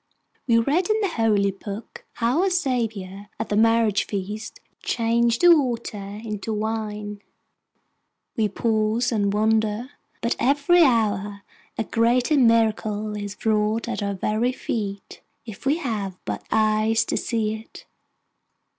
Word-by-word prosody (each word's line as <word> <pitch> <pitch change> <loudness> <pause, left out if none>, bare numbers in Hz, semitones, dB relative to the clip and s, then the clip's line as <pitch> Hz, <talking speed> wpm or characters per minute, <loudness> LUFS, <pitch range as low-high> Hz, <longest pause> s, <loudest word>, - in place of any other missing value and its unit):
We 230 -2 +4
read 295 - +1
in 430 0 +2
the 400 - +1
Holy 210 - +2
Book 200 +3 -9
how 245 +7 +1
our 390 - +2
Saviour, 225 - -2
at - - -3
the 205 - 0
marriage 225 -1 +3
feast, 210 +2 -5 0.2
changed 235 0 +1
the 350 -1 +8
water 225 -7 -3
into 215 0 -4
wine; 210 -1 -4 1.1
we 215 -2 +1
pause 220 +3 0
and 205 -3 +1
wonder; 220 +3 +1 0.3
but 235 - 0
every 290 +7 +4
hour 205 -6 +1 0.3
a - - 0
greater 240 +6 +2
miracle 220 -4 +2
is 205 0 -7
wrought 215 +1 +1
at 240 - -3
our 200 -1 -2
very 215 +6 0
feet, 200 -6 -5 0.2
if 225 +3 -8
we 290 +3 +3
have 210 - -3
but 105 -1 -4
eyes 220 +1 +2
to - - -2
see 220 -2 -1
it. 220 +1 -11
220 Hz, 135 wpm, -23 LUFS, 210-235 Hz, 1.1 s, the